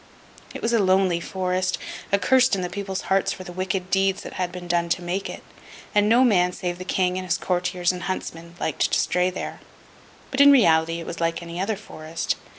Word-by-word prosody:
It - - -7
was 235 - +1
a 230 - +4
lonely 185 -2 +3
forest, 185 +1 -1 0.3
accursed 255 +4 +4
in 185 - -3
the 180 - -4
people's 195 -1 -4
hearts 195 0 +1
for 185 - -6
the 180 - -9
wicked 185 +1 -3
deeds 195 0 +1
that - - -8
had 180 -1 -2
been 180 0 -8
done 170 -1 +1
to 175 - 0
make 180 +3 -3
it; - - -8 0.5
and 205 0 +3
no 240 +3 +6
man 180 -7 +3
save 175 -1 -4
the 185 - -6
King 185 0 0
and 185 - -6
his 175 -1 +1
Courtiers 180 0 0
and 180 -1 -7
Huntsmen, 170 -2 -5
liked - - 0
to - - +3
stray 180 +1 +1
there. 185 - -6 0.7
But, 270 - +2
in 285 0 +9
reality, 165 -9 +4
it 165 - -7
was 170 - -6
like 165 0 -1
any 170 +1 -7
other 210 +3 0
forest. 165 -5 -4
185 Hz, 215 wpm, -24 LUFS, 175-195 Hz, 0.7 s, in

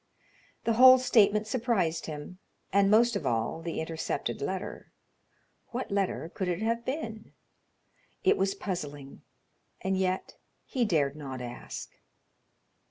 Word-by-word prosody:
The 230 - +2
whole 260 0 +11
statement 215 -4 +4
surprised 215 -9 0
him, 155 +4 -7 0.3
and, 200 0 +5
most 230 +2 +5
of 200 - -2
all, 115 +7 -1
the 165 0 -4
intercepted 160 0 -3
letter. - - -4 0.8
What 245 -2 -5
letter 195 -4 -1
could 190 - -2
it 175 -1 -1
have 230 +1 0
been? 230 -5 -5 0.9
It 395 +1 +5
was 195 - 0
puzzling, 145 -9 -5 0.6
and 190 0 -1
yet 185 0 -1 0.3
he 250 -3 0
dared 150 -8 +1
not 135 -4 -6
ask. 120 0 -8
190 Hz, 125 wpm, -29 LUFS, 160-230 Hz, 0.9 s, whole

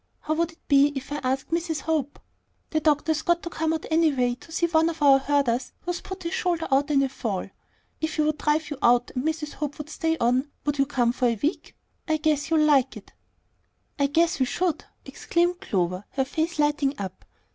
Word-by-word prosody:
How 310 - -1
would 330 +1 -1
it - - -30
be 280 0 +5
if 270 +1 -6
I 295 - -1
asked 265 +1 -2
Mrs. 330 -3 -1
Hope? 295 -3 -1 0.5
The 315 - +2
doctor's 310 0 +1
got 345 0 +1
to 340 - -5
come 320 0 -1
out 320 -1 -2
anyway 285 -7 +3
to 330 - -15
see 335 +1 +1
one 325 -1 +3
of 325 - -6
our 275 -1 +7
herders 270 -3 0
who's 350 0 -3
put 380 -1 -8
his 335 +2 -3
shoulder 345 -3 0
out 280 +2 +3
in 275 -2 +3
a - - +2
fall. 215 -8 -3 0.5
If 315 0 -2
he 310 - +2
would 305 0 0
drive 300 0 0
you 285 - -5
out, 245 0 +3
and 250 - -2
Mrs. 315 -1 -2
Hope 290 -2 -4
would 300 +1 -8
stay 325 +1 -1
on, 255 +3 +1 0.2
would 290 -1 -1
you 275 - +3
come 245 -4 +1
for 250 0 +1
a 235 - +1
week? 305 +5 -2 0.3
I 315 -1 +2
guess 305 -1 0
you'll 315 -2 +4
like 275 -3 +3
it." - - -14 0.9
"I 280 - +3
'guess' 330 +2 +2
we 260 - +2
should," 355 +2 -1 0.2
exclaimed 350 +1 0
Clover, 180 0 -1
her 265 - 0
face 320 +4 -2
lighting 295 -1 +1
up. 190 -2 -6
295 Hz, 215 wpm, -25 LUFS, 270-320 Hz, 0.9 s, our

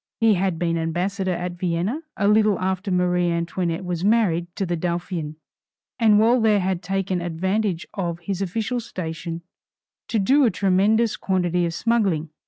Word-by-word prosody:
He 225 -2 +5
had 185 -2 0
been 165 -1 0
ambassador 185 +4 -1
at 175 0 -4
Vienna 180 - -1 0.2
a 200 - +1
little 210 -1 +4
after 190 +2 -2
Marie 180 -1 +1
Antoinette 170 +1 -2
was 175 -1 -3
married 200 -6 +2
to 195 - -1
the 175 -1 -1
Dauphin, 170 -2 -3 0.6
and 220 -3 +5
while 230 +3 +4
there 215 -2 +4
had 185 -1 -1
taken 195 -2 -2
advantage 185 +2 -1
of 175 -4 -3
his 190 +2 -3
official 215 +6 -2
station 165 -5 -6 0.6
to 230 - -1
do 265 +8 +4
a 245 - +5
tremendous 205 +4 +2
quantity 180 -2 0
of 165 - -4
smuggling. 195 -10 +1
185 Hz, 160 wpm, -23 LUFS, 170-210 Hz, 0.6 s, He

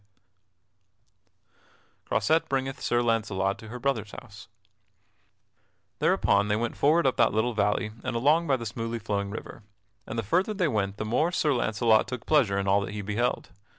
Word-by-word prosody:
[Sidenote: 100 0 -44 0.5
Croisette 160 +1 +1
bringeth 135 -1 -2
Sir 120 0 +1
Launcelot 105 -4 0
to 110 - -11
her 120 +3 -7
brother's 120 -5 -1
house] 110 -3 -11 1.5
Thereupon 100 +1 +2
they 105 - +1
went 115 +2 -2
forward 155 +3 +3
up 130 - +1
that - - +3
little 120 +3 +1
valley, 105 0 0
and 130 -2 -3
along 150 +8 +3
by 135 - +2
the 115 - -7
smoothly 115 +2 -4
flowing 100 -2 -3
river, 110 +2 -8 0.5
and 115 - -5
the 115 - -1
farther 185 - 0
they 185 -4 +1
went 100 -6 -1
the 110 - -3
more 140 +10 +1
Sir 155 -5 +1
Launcelot 110 -2 +2
took 125 -3 -6
pleasure 125 -11 +3
in 100 0 -1
all 100 +1 +3
that 100 0 -5
he 105 -1 -5
beheld. 110 +3 -2
110 Hz, 175 wpm, -27 LUFS, 100-125 Hz, 1.5 s, forward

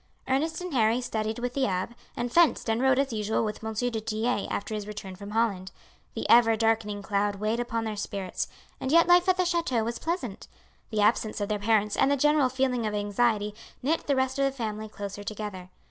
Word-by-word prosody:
Ernest 310 +5 0
and 360 -3 -5
Harry 230 -1 +3
studied 220 -3 -2
with 245 0 -3
the 270 -1 +1
abbe, 185 +4 -2 0.2
and 240 0 -2
fenced 340 -7 +4
and 225 +2 0
rode 265 -1 +4
as 275 -2 +1
usual 215 +1 0
with 215 +1 -5
M. 220 0 -3
du 245 +3 0
Tillet 220 0 -1
after 205 - -3
his 210 -1 -4
return 200 -3 -7
from 200 +2 -9
Holland. 205 -4 0 0.4
The - - -3
ever 230 -1 +6
darkening 220 -2 0
cloud 205 0 0
weighed 215 +3 -1
upon 235 -1 -2
their 220 -1 -3
spirits, 200 -2 -3 0.3
and 265 - -2
yet 335 +1 +6
life 355 +1 +5
at 370 - +4
the 365 - +2
chateau 335 -10 +1
was 235 +1 -3
pleasant. 320 - -4 0.4
The 215 -2 0
absence 215 +1 +2
of 205 0 -2
their 210 -1 0
parents 210 0 +2
and - - +3
the 285 - +2
general 295 -1 +3
feeling 250 -3 0
of 210 - -2
anxiety 210 0 +1 0.3
knit 315 +5 0
the 280 - +3
rest 260 +1 0
of 275 - +3
the 275 - +1
family 220 -4 -4
closer 205 -1 -6
together. 205 -3 -6
225 Hz, 215 wpm, -27 LUFS, 210-260 Hz, 0.4 s, ever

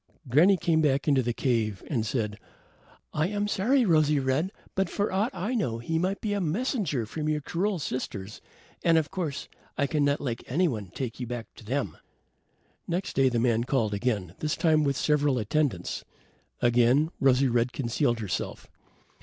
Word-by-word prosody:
Granny 165 +10 +5
came 160 -1 +2
back 140 -1 +1
into 140 -3 +4
the 120 -1 -1
cave 115 -5 0
and 120 -7 0
said, 105 -4 -2 0.7
"I 155 +2 +1
am 205 +1 -1
sorry, 240 +6 +2
Rosy 155 -4 +4
red, 135 +8 0 0.2
but 195 0 0
for 205 0 -1
aught 200 +5 +1
I 210 +8 -3
knew, 170 - 0
he 160 +8 -1
might 190 +3 -1
be 210 -2 -1
a 200 - 0
messenger 175 - -1
from 150 +7 -3
your 155 0 +1
cruel 185 +7 -1
sisters; 110 - -5 0.4
and, 165 -1 +5
of 155 -2 0
course, 160 -7 -3 0.3
I 140 - +2
cannot 145 0 +1
let 120 -4 -3
anyone 125 - 0
take 125 -3 -4
you 125 - -4
back 120 -1 -6
to - - -14
them." 130 +6 -2 0.9
Next 175 +3 -2
day, 135 -1 +4
the 120 - -1
man 115 -1 +2
called 120 -5 0
again, 100 -5 -1
this 155 -1 -1
time 155 -2 +3
with 140 -1 +1
several 145 -3 +2
attendants. 125 - -1 0.6
Again, 120 +6 +4
Rosy 135 0 +4
red 120 0 +1
concealed 120 -2 0
herself. 100 -4 -4
140 Hz, 170 wpm, -27 LUFS, 120-165 Hz, 0.9 s, Granny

